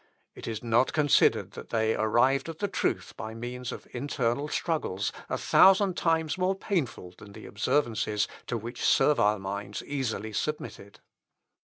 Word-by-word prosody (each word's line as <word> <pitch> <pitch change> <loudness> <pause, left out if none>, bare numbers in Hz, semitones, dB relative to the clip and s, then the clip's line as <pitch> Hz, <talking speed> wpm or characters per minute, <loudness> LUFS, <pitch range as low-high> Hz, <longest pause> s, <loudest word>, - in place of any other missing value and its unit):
It - - -9
is 115 -1 -4
not 120 +2 +2
considered 145 -2 +3
that - - -10
they 110 -1 +1
arrived 120 +7 +2
at 165 - -6
the 205 - -1
truth - - -2
by 110 +2 -7
means 125 +1 -5
of - - -8
internal 140 0 -1
struggles, 150 - -1 0.2
a - - -1
thousand 195 -1 +5
times 160 -1 0
more 185 +1 +1
painful 155 - -3
than 100 -2 -13
the - - -11
observances 110 -3 0 0.2
to 120 - -1
which 120 +3 -7
servile 105 -8 +4
minds 100 +1 -5
easily 115 -6 -3
submitted. 110 -6 -5
120 Hz, 150 wpm, -28 LUFS, 110-150 Hz, 0.2 s, thousand